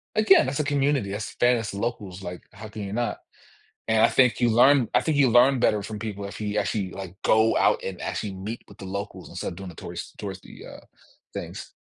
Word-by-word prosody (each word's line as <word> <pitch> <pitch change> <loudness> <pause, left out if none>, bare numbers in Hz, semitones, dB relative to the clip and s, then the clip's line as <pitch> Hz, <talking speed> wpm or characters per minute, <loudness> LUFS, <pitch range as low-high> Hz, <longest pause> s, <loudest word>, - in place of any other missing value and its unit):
again, 215 - +6
that's 135 +2 -2
a - - +2
community, 140 -6 +1
that's 105 +2 -5
that 120 0 +4
is 110 -3 -3
locals, 100 -3 -4
like, 90 0 -6
how 110 +2 -9
can 110 -1 -7
you 100 0 -5
not? 120 +2 -2 0.7
And 110 0 +3
I - - +6
think 125 -3 +3
you 120 - +4
learn 125 +2 +5
I - - +4
think 160 - 0
you 135 -3 +5
learn 125 +3 +5
better 105 -2 +2
from 105 +1 -6
people 100 -2 -5
if 100 - -8
you 105 0 -2
actually, 100 -2 -2
like, 95 -2 -8
go 110 +1 +3
out - - +3
and 95 -2 -5
actually 105 -3 -3
meet 100 +5 -6
with 100 - -16
the 95 - -8
locals 100 +2 -6
instead - - -4
of - - -9
doing 95 +1 -8
the 85 - -12
tourist - - -8
touristy, 95 -2 -8
uh, - - -11 0.5
things. - - -7
110 Hz, 230 wpm, -25 LUFS, 100-120 Hz, 0.7 s, again